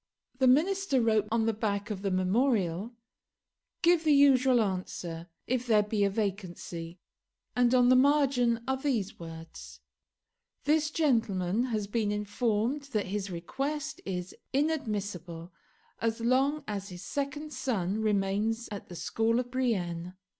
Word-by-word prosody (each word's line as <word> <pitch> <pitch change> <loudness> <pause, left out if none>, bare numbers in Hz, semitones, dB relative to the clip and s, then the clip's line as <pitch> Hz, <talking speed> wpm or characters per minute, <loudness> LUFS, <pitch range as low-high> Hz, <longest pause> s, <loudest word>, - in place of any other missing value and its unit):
The 260 - +4
Minister 320 +2 +3
wrote 220 -3 +2
on 225 -1 +2
the 225 - +2
back 205 -1 -2
of 195 -2 -4
the 200 - -1
memorial, 195 +1 +1 0.9
"Give 340 -1 +4
the 305 -2 +4
usual 265 -3 +5
answer, 180 -4 -3 0.2
if 250 0 -1
there 215 -3 +5
be 210 0 0
a 200 - +3
vacancy;" 185 -4 -4 0.6
and 245 0 +4
on 250 -1 +5
the 255 - +7
margin 255 -4 +3
are 265 0 +1
these 245 -8 -2
words 160 - -10 0.8
"This 305 +2 +2
gentleman 230 - +1
has 220 -5 -2
been 210 0 -1
informed 210 +5 0
that 210 - +1
his 200 -1 -2
request 275 - -4
is 180 -1 -5 0.2
inadmissible 205 - -2 0.5
as 225 0 -1
long 270 +5 +2
as 200 -1 -4
his 180 0 -9
second 290 +5 -4
son 215 -5 -1
remains 210 +2 0
at 205 - -7
the 175 - -8
school 225 +6 0
of 245 -1 -4
Brienne. 180 -9 -1
220 Hz, 140 wpm, -29 LUFS, 195-260 Hz, 0.9 s, the